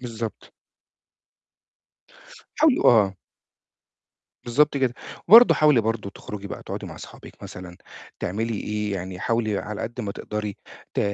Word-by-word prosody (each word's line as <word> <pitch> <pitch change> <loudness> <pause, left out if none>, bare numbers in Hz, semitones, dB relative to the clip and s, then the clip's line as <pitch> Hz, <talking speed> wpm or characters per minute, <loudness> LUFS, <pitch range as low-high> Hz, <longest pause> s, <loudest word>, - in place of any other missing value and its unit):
بالضبط. 115 -2 -7 2.1
حاولي 310 -4 +4
آه. 105 -5 +5 1.3
بالضبط 140 +5 +2
كده. 130 -3 0 0.3
وبرضه 230 +4 +9
حاولي 150 -5 +4
برضه 110 -2 -2
تخرُجي 100 0 -8
بقى - - -7
تقعُدي - - -6
مع - - -9
صحابِك - - -13
مثلًا 90 -1 -9 0.4
تعملي 110 +5 -2
إيه، 105 -1 -3
يعني 95 -1 -5
حاولي 110 -3 0
على 105 0 -5
قد 120 +2 -5
ما 100 -3 -4
تقدري 105 -1 -5 0.4
ت - - +1
110 Hz, 125 wpm, -24 LUFS, 100-120 Hz, 2.1 s, وبرضه